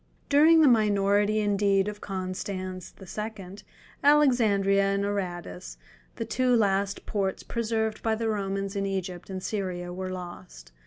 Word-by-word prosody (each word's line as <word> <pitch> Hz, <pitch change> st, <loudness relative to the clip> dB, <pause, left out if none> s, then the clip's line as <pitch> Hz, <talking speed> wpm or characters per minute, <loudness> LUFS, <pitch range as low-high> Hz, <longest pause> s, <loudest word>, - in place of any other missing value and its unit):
During 315 Hz, +3 st, +6 dB
the 305 Hz, -, +6 dB
minority 205 Hz, -2 st, +3 dB
indeed 200 Hz, -1 st, +2 dB
of 210 Hz, 0 st, -6 dB
Constans 185 Hz, -1 st, -5 dB
II., 190 Hz, -, -10 dB, 1.0 s
Alexandria(20) 240 Hz, -10 st, +4 dB
and 200 Hz, 0 st, +1 dB
Aradus, 175 Hz, -, -4 dB, 0.4 s
the -, -, -4 dB
two 255 Hz, -1 st, +1 dB
last 200 Hz, -2 st, +1 dB
ports 195 Hz, -2 st, -2 dB
preserved 220 Hz, -2 st, -2 dB
by 225 Hz, -1 st, +1 dB
the 225 Hz, 0 st, -2 dB
Romans 195 Hz, -1 st, -2 dB
in 195 Hz, 0 st, -1 dB
Egypt 185 Hz, -2 st, -4 dB
and 190 Hz, -1 st, -5 dB
Syria 180 Hz, -4 st, -3 dB
were 185 Hz, +1 st, -4 dB
lost. 175 Hz, -, -9 dB
200 Hz, 135 wpm, -27 LUFS, 185-215 Hz, 1.0 s, During